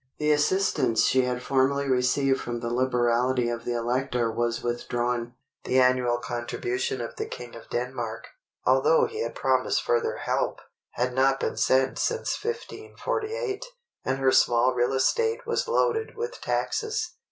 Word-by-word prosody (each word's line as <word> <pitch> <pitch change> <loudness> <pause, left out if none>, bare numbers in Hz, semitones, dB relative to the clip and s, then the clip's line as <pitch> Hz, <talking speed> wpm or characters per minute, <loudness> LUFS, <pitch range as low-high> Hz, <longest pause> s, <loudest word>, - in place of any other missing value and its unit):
The 150 0 +1
assistance 150 -5 +2
she 130 -1 +3
had 125 0 -2
formerly 140 +2 +1
received 135 +1 +2
from 120 0 -4
the 115 0 -3
liberality 125 0 +2
of 120 0 -4
the 120 - -1
Elector 120 0 0
was 120 +1 -1
withdrawn; 120 0 -2 0.3
the 130 - +2
annual 125 -1 +3
contribution 120 +1 -3
of 115 - -6
the - - -3
King 120 -1 -8
of 115 - -12
Denmark—although 125 - 0
he 445 0 -5
had - - -3
promised - - +1
further 470 -1 +1
help—had 125 - -3
not 135 +1 +3
been - - -2
sent 130 0 +2
since 470 -2 -1
1548, 455 0 -3 0.4
and 130 +1 -1
her 135 -1 +3
small 120 0 +4
real 120 +1 +1
estate 455 - +1
was 465 +1 -1
loaded 455 -2 0
with 470 +2 -5
taxes. 435 -5 -1
130 Hz, 140 wpm, -26 LUFS, -, 0.4 s, small